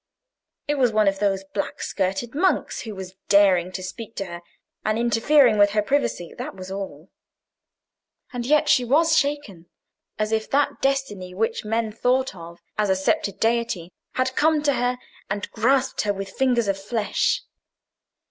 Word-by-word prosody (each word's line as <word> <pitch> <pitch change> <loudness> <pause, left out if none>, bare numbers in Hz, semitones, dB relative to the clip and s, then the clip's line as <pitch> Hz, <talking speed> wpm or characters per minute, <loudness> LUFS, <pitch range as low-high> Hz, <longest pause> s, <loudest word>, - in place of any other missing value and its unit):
It 295 -1 0
was 250 -3 +4
one 215 -1 +3
of 195 0 +1
those 195 -1 +1
black 195 +1 -4
skirted 195 +5 -2
monks 365 +6 +1
who 220 -3 -7
was 190 -1 -8 0.2
daring 190 -3 +4
to 185 - -5
speak 225 +4 -8
to 195 - -3
her, 175 -1 -8 0.4
and 215 0 0
interfere 235 +2 +4
with 205 -1 +5
her 210 - +4
privacy: 265 -9 -1
that - - -5
was 185 0 -8
all. 190 -4 -7 1.2
And 245 -1 -3
yet 300 +4 +3
she 255 - +4
was 320 +6 +3
shaken, 280 - -1 0.5
as 215 0 -1
if 220 -1 -1
that 285 +1 +1
destiny 210 -10 -1
which 225 +3 -1
men 225 +1 -1
thought 255 +4 +1
of 170 -1 -10 0.2
as 210 -1 +2
a 190 - +4
sceptred 190 +1 0
deity 225 -7 0 0.2
had 255 0 0
come 310 0 +3
to 285 -1 +3
her, 245 0 0 0.3
and 205 0 -3
grasped 260 +4 +1
her 205 -1 0
with 195 0 -6
fingers 245 -3 +1
of 195 0 0
flesh. 210 0 0
215 Hz, 165 wpm, -23 LUFS, 195-255 Hz, 1.2 s, with